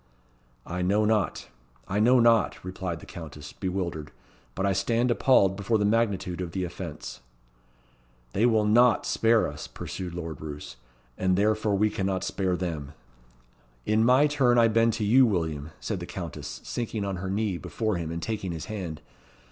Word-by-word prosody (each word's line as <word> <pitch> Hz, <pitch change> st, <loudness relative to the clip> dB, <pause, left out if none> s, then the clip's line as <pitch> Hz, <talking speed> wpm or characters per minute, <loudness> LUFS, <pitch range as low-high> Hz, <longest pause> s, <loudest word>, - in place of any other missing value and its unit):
"I 90 Hz, +1 st, -4 dB
know 100 Hz, +4 st, +2 dB
not 105 Hz, -4 st, 0 dB, 0.4 s
I 100 Hz, -, -1 dB
know 125 Hz, +4 st, +5 dB
not," 115 Hz, -5 st, +3 dB
replied 90 Hz, -2 st, -4 dB
the -, -, -11 dB
Countess, 75 Hz, -4 st, -9 dB
bewildered; 90 Hz, -6 st, -3 dB, 0.4 s
"but 95 Hz, -, -1 dB
I 100 Hz, -, +2 dB
stand 115 Hz, +5 st, +1 dB
appalled 100 Hz, -5 st, +4 dB
before 105 Hz, +3 st, 0 dB
the 105 Hz, -, +1 dB
magnitude 100 Hz, -5 st, 0 dB
of 85 Hz, -2 st, -5 dB
the 95 Hz, -, -1 dB
offence." 85 Hz, -3 st, -7 dB, 1.1 s
"They 110 Hz, +5 st, +3 dB
will 110 Hz, -3 st, +3 dB
not 120 Hz, +3 st, +4 dB
spare 115 Hz, -1 st, +3 dB
us," 75 Hz, +1 st, -7 dB
pursued 90 Hz, -2 st, -6 dB
Lord 80 Hz, -4 st, -6 dB
Roos; 75 Hz, -4 st, -7 dB, 0.4 s
"and 95 Hz, -1 st, +2 dB
therefore 105 Hz, 0 st, +2 dB
we 105 Hz, +2 st, +2 dB
cannot 95 Hz, -1 st, -1 dB
spare 95 Hz, -2 st, -1 dB
them." 80 Hz, -6 st, -4 dB, 0.9 s
"In 110 Hz, +1 st, +3 dB
my 130 Hz, +5 st, +5 dB
turn 135 Hz, -5 st, +3 dB
I 115 Hz, -1 st, +5 dB
bend 115 Hz, +1 st, +3 dB
to 115 Hz, -1 st, -2 dB
you, 120 Hz, +6 st, +6 dB
William," 80 Hz, -7 st, -2 dB
said -, -, -3 dB
the -, -, -7 dB
Countess, -, -, -6 dB
sinking 110 Hz, -3 st, -3 dB
on 100 Hz, -2 st, -3 dB
her 95 Hz, +1 st, -4 dB
knee 100 Hz, -2 st, -1 dB
before 110 Hz, -4 st, -2 dB
him, 85 Hz, -2 st, -4 dB
and 85 Hz, 0 st, -4 dB
taking 95 Hz, -1 st, -3 dB
his 80 Hz, -, -6 dB
hand. 90 Hz, -8 st, -5 dB
100 Hz, 170 wpm, -27 LUFS, 90-110 Hz, 1.1 s, you